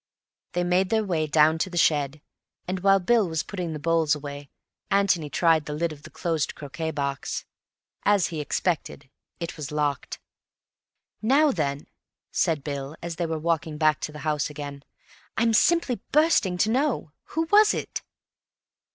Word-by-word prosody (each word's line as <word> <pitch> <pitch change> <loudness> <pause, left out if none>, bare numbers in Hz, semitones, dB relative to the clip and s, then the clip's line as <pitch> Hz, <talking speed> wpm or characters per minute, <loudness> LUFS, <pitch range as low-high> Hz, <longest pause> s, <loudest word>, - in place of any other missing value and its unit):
They 175 - +1
made 180 +1 +2
their 220 0 +2
way 165 -6 0
down 155 +2 +4
to 185 - 0
the 175 - -6
shed, 150 -2 +2 0.5
and 185 +1 -2
while 195 +1 +5
Bill 210 0 +2
was 160 0 -1
putting 180 -4 -4
the - - -4
bowls 165 0 +2
away, 145 -1 -8 0.4
Antony 195 -6 +2
tried 165 -1 +2
the 150 - -3
lid 170 +2 -1
of 150 -2 -10
the 155 - -11
closed 160 -2 -2
croquet 155 +3 -5
box. 140 -3 -3 0.6
As 205 -3 +4
he 160 -3 -3
expected, 150 -3 -2 0.3
it 170 -1 -5
was 150 -1 -6
locked. 145 -3 -2 1.0
"Now 280 +7 +4
then," 145 - -2 0.5
said 155 -4 +1
Bill, 140 0 -5
as 170 -1 -5
they 170 - -1
were 160 0 -2
walking 160 -1 -1
back 155 -2 +3
to - - -4
the 150 - -9
house 150 -1 0
again, 145 -1 -7 0.5
"I'm 230 0 +3
simply 275 0 +3
bursting 295 - +3
to 215 +5 +2
know. 260 - 0 0.2
Who 325 - +2
was 420 +1 +6
it?" - - -4
160 Hz, 165 wpm, -26 LUFS, 150-190 Hz, 1.0 s, was